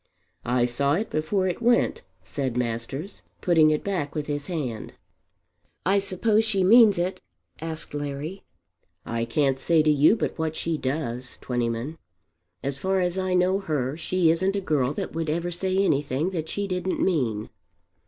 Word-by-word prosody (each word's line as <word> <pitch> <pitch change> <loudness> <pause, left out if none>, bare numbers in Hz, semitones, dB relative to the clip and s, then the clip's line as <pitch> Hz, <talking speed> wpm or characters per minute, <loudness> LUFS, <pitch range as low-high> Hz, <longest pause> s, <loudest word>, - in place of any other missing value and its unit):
"I 120 0 +3
saw 140 +4 +1
it 210 +8 -1
before 185 +5 0
it 180 +5 -3
went," 240 +1 +2 0.2
said 130 -4 -3
Masters 125 - -3 0.2
putting 160 -3 +4
it 155 -1 0
back 175 -8 -2
with 150 -2 -2
his 145 -1 -3
hand. 135 -11 -4 0.9
"I 195 +2 +4
suppose 210 +3 +1
she 205 -4 +1
means 215 0 +7
it?" 180 +2 -2 0.4
asked 160 -2 -4
Larry. 145 +5 -4 0.6
"I 115 0 -2
can't 135 +2 +1
say 160 +2 +3
to 155 - +4
you 150 +8 +5
but 220 - -3
what 160 -1 -1
she 165 0 -1
does, 130 -3 -3
Twentyman. 120 +5 -3 0.6
As 140 0 -3
far 190 +3 +1
as 180 +1 0
I 185 -1 0
know 185 +2 +3
her 145 -7 -2
she 170 0 +2
isn't 190 +4 +1
a - - +1
girl 145 -7 +1
that - - -4
would 165 -1 -2
ever 170 +3 -1
say 185 +2 0
anything 145 -3 +1
that 160 -4 -4
she 205 - -2
didn't 185 0 -2
mean." 120 - 0
160 Hz, 165 wpm, -25 LUFS, 140-185 Hz, 0.9 s, means